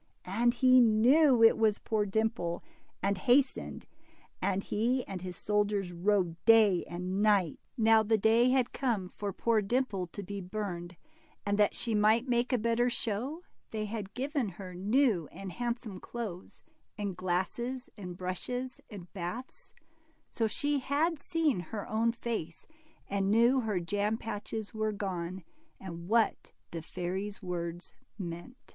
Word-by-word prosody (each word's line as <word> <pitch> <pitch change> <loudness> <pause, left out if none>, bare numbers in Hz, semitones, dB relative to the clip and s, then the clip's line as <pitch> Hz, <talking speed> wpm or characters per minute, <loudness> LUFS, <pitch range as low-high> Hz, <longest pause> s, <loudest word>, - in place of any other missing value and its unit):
And 235 +6 +2
he 255 0 +6
knew 245 +4 +5
it 225 - +7
was 215 -2 +3
poor 215 -2 -1
Dimple, 195 -5 -1 0.4
and 200 -1 +1
hastened, 260 +6 +2 0.6
and 195 +1 0
he 245 +4 0
and 190 -2 -5
his 180 -1 -6
soldiers 205 -3 0
rode 175 -2 0
day 215 -5 +6
and 180 +3 -3
night. 200 -7 +3 0.2
Now 225 -1 +5
the 220 +1 +2
day 225 +4 +4
had 255 -1 +2
come 220 -9 -1
for 205 +1 -4
poor 225 +3 +1
Dimple 205 -4 -1
to 200 +4 -7
be 200 +1 -5
burned, 180 -2 -5 0.5
and 205 0 0
that 210 - +4
she 230 - 0
might 215 +4 +3
make 240 +1 +1
a 250 - +3
better 235 +2 +2
show, 245 - -2 0.3
they 215 -1 -3
had 205 -2 -6
given 270 -3 -1
her 185 0 -9
new 205 - +2
and 190 +1 -7
handsome 235 -2 -4
clothes, 205 -7 -7 0.3
and 200 -3 -3
glasses, 190 +8 -2
and 180 -4 -7
brushes, 245 +8 -4
and 200 -5 -8
bath^; 200 +7 -6 0.6
so 225 - +1
she 285 +6 0
had 295 +5 0
seen 320 - +1
her 195 +4 -6
own 225 +2 +2
face, 225 -8 -4 0.4
and 195 -1 0
knew 235 +5 +5
her 215 -6 0
jam 205 +5 0
patches 220 0 -5
were 215 0 0
gone, 185 -3 -4 0.4
and 170 -2 -8
what 225 +2 +1 0.2
the 165 - -4
fairy's 190 +5 -4
words 175 -1 -4 0.2
meant. 175 +6 -6
210 Hz, 150 wpm, -31 LUFS, 185-235 Hz, 0.6 s, it